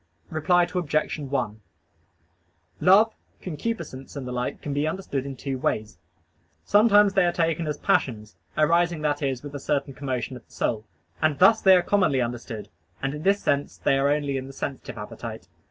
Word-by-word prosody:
Reply 175 +3 +3
Obj. 170 -4 -1
1: 130 -7 -3 1.2
Love, 210 +4 +5 0.3
concupiscence, 160 -7 -5
and 135 -3 -5
the - - -4
like 125 0 -3
can 145 - -4
be 145 +2 0
understood 155 -6 -3
in 135 - -6
two 135 0 -4
ways. 110 -3 -2 0.7
Sometimes 205 -1 +5
they 195 -1 +4
are 175 - +3
taken 165 -1 0
as 150 -1 -2
passions 110 -4 0 0.2
arising, 165 +1 +2
that 150 0 0
is, 135 -3 -2
with 145 -1 -8
a 145 - -5
certain 140 -1 -1
commotion 130 -2 -3
of 125 - -11
the - - -27
soul. 110 -1 -1 0.4
And 155 -2 +2
thus 220 +7 +6
they 190 -1 +7
are 180 - +3
commonly 185 -9 +2
understood, 120 -3 -4 0.3
and 135 +1 -2
in 150 - -6
this 200 +4 +2
sense 140 0 0
they - - +2
are 140 +1 +2
only 145 -2 0
in 130 0 -5
the 135 - -10
sensitive 135 0 -5
appetite. - - -7
145 Hz, 180 wpm, -25 LUFS, 135-175 Hz, 1.2 s, they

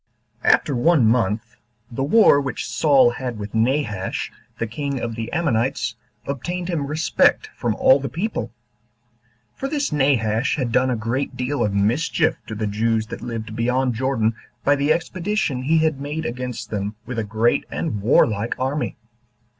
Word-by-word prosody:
1. - - +5
After 140 - +2
one 145 0 +4
month, 115 0 +1 0.3
the 120 - -4
war 150 -2 +5
which 135 -2 -4
Saul 140 -5 +4
had 125 -1 -5
with 105 -1 -7
Nahash, 110 -4 -1 0.3
the 115 - -1
king 140 +4 -3
of 115 -1 -3
the 115 0 -5
Ammonites, 135 -6 0 0.3
obtained 175 +7 -4
him 155 -5 -1
respect 155 +3 +2
from 115 -3 -1
all 130 +5 +5
the 135 -1 -4
people; 185 - -3 1.0
for 270 - -4
this 285 - -1
Nahash 130 -5 +2
had 130 -6 -2
done 130 +2 +3
a 125 - +1
great 115 +5 -2
deal 130 0 -1
of 105 -2 -1
mischief 135 +10 +1
to 110 - -5
the 110 0 -2
Jews 110 +2 0
that - - -7
lived 115 -2 -5
beyond 125 +2 +1
Jordan 115 -2 0 0.3
by 145 - +4
the 140 +2 +1
expedition 170 -4 -1
he 155 +5 +2
had 155 -3 +1
made 150 +3 -4
against 125 0 -5
them 105 0 -3
with 120 0 -4
a - - 0
great 110 +3 +1
and 125 -12 -3
warlike 110 0 +2
army. 135 +4 -2
125 Hz, 165 wpm, -22 LUFS, 115-145 Hz, 1.0 s, 1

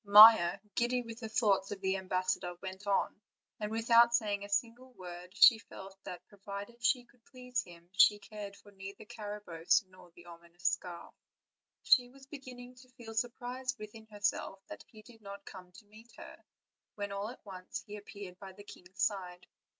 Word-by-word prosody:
Maia, 210 -3 +9 0.2
giddy 245 +3 +1
with 230 -1 -9
the 225 - -6
thoughts 205 -4 +2
of 205 - -5
the 190 0 0
ambassador, 185 -1 -1
went 190 +2 -8
on, 200 - +1 0.4
and 210 -1 -2
without 230 +1 +5
saying 205 -3 0
a 205 - -8
single 240 +5 -2
word 180 -3 -9
she 225 - +9
felt 195 -3 -11
that 180 - -8
provided 205 +3 -9
she 245 +3 +3
could 245 -1 -28
please 250 -2 -3
him 170 -1 -14
she 205 +2 +7
cared 205 -1 -8
for 205 - -17
neither 195 +1 -9
Carabosse 210 -6 0
nor 185 -1 -16
the 175 - -15
ominous 170 0 -15
scarf; 175 -1 -3 0.7
she 245 -2 +5
was 270 +1 -16
beginning 255 -3 -10
to 255 0 -18
feel 235 -3 -10
surprised 250 +3 -2
within 220 +1 -10
herself 205 -2 -2
that - - -8
he 215 -4 -15
did 225 -1 -16
not 200 -1 -9
come 180 -2 -11
to 200 +4 -16
meet 220 +3 -17
her, - - -11 0.5
when 205 -1 -4
all 200 +2 -3
at 245 - -12
once 185 -2 -7
he 210 - -8
appeared 200 -3 -10
by 190 -1 -9
the 205 - -13
king's 185 -1 -6
side. 180 -3 -2
205 Hz, 180 wpm, -33 LUFS, 190-235 Hz, 0.7 s, Maia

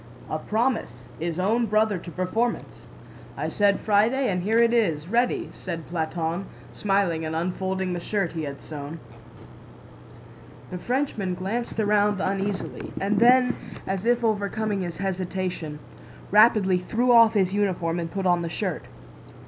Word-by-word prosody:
"A - - -1
promise 220 - -1
is 165 0 -3
own 225 +6 +1
brother 215 -2 +2
to 170 - -9
performance! 185 +8 -2 0.5
I - - -2
said 200 -1 +2
Friday 225 +5 +2
and 180 -1 -1
here 215 +5 +1
it 235 0 +4
is, 165 -10 +1
ready," 240 +5 +1
said 170 -3 -6
Platón, 165 +2 -2 0.3
smiling 195 -5 0
and 160 0 -3
unfolding 185 +2 -2
the 175 - -2
shirt 195 -1 -1
he 165 - -4
had 140 -2 -6
sewn. 150 +1 -7 1.7
The 180 - -4
Frenchman 235 -7 -1
glanced 215 +6 -3
around 210 -1 +2
uneasily 195 +1 -3
and 200 +2 +1
then, 250 +1 +5 0.3
as 195 +3 -2
if 240 0 +2
overcoming 210 -1 0
his 175 -3 -4
hesitation, 185 -4 -3 0.5
rapidly 210 -3 +5
threw 240 +7 +1
off 230 -2 +7
his 190 -2 +2
uniform 180 -4 0
and 165 -1 -3
put 195 +2 -3
on 175 -1 +3
the 170 - -3
shirt. - - -3
195 Hz, 145 wpm, -25 LUFS, 175-220 Hz, 1.7 s, off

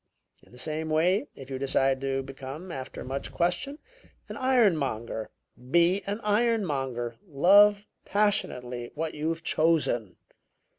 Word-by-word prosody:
In - - -23
the 125 - -15
same 155 +4 -3
way, 180 - +2
if 135 0 -11
you 130 - -3
decide 135 0 +1
to 135 0 -1
become, 135 +6 -8
after 130 -4 -7
much 135 +2 -5
question, 175 +12 -1 0.5
an - - -6
ironmonger, 155 - +1 0.4
be 170 +5 +4
an 205 +2 -2
ironmonger. 150 - 0
Love 200 +7 +5 0.2
passionately 125 -13 0
what 160 +1 -3
you've 160 +2 -3
chosen. 150 - +1
155 Hz, 120 wpm, -27 LUFS, 135-195 Hz, 0.5 s, Love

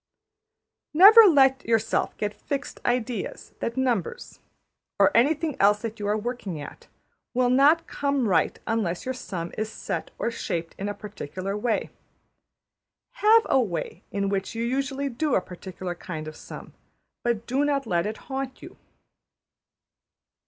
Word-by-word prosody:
Never 425 +7 +10
let 270 -5 +4
yourself 225 -1 0
get 210 0 -2
fixed 285 +3 -5
ideas 245 -3 -2
that 235 - -3
numbers 245 -9 -2 0.6
(or 290 - +4
anything 300 +5 +2
else 205 +2 +4
that 225 -1 -5
you 205 - -3
are 210 +1 +1
working 215 -7 -4
at) 145 - -10 0.5
will 250 0 +3
not 295 +6 +5
come 280 -5 -1
right 165 -5 +2
unless 200 -6 -1
your 260 - -2
sum 180 -9 -6
is 215 0 -2
set - - -4
or 235 - -1
shaped 165 -7 -4
in 200 +1 -2
a 205 - -4
particular 195 -2 -6
way. 220 +1 -1 1.3
Have 445 +2 +5
a 265 - +4
way 180 -4 -4
in 200 -1 -1
which 195 +2 -2
you 230 - -2
usually 275 +3 -1
do 275 +3 0
a - - +4
particular 185 0 -7
kind 160 -3 -7
of 155 - -8
sum, - - -10 0.5
but 235 -2 -1
do 265 +4 0
not 280 -2 0
let 175 -3 0
it 215 - -4
haunt 265 -1 -5
you. - - -11
230 Hz, 150 wpm, -25 LUFS, 195-270 Hz, 1.3 s, Never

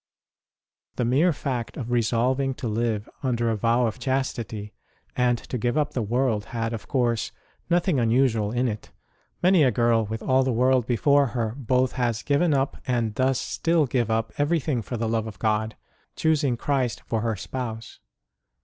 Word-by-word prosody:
The 125 - 0
mere 145 +9 +3
fact 130 -6 -4
of 120 -2 -5
resolving 125 +3 +1
to 125 - -4
live 110 -1 -1
under 120 -4 0
a - - 0
vow 115 +3 +2
of 115 +2 -3
chastity 115 -5 -3 0.4
and 125 -1 +2
to 125 - -5
give 120 +5 0
up 150 - +1
the 125 - -1
world 115 -1 0
had, 115 +1 -3
of 115 - -6
course, 120 -5 0 0.4
nothing 175 -4 +2
unusual 115 -2 +2
in 125 +2 +1
it: 105 -2 -5 0.5
many 180 -1 +5
a 130 - +5
girl 115 -1 +2
with 110 +1 -5
all 130 0 +3
the 130 0 +1
world 125 0 +2
before 140 +3 +3
her 110 -2 -1
both 130 -1 +1
has 120 -3 -1
given 145 +4 +2
up, 135 -1 0
and 120 -4 0
does 130 +2 +1
still 165 -2 +1
give 120 -3 0
up, 115 0 -1
everything 145 -4 +1
for 120 +3 -5
the 115 0 -1
love 110 0 -1
of 105 -4 -8
God, 110 +2 0 0.4
choosing 150 -6 +1
Christ 130 -4 -1
for 115 -1 -1
her 115 -1 -1
Spouse. 115 +2 -6
120 Hz, 175 wpm, -25 LUFS, 115-135 Hz, 0.5 s, many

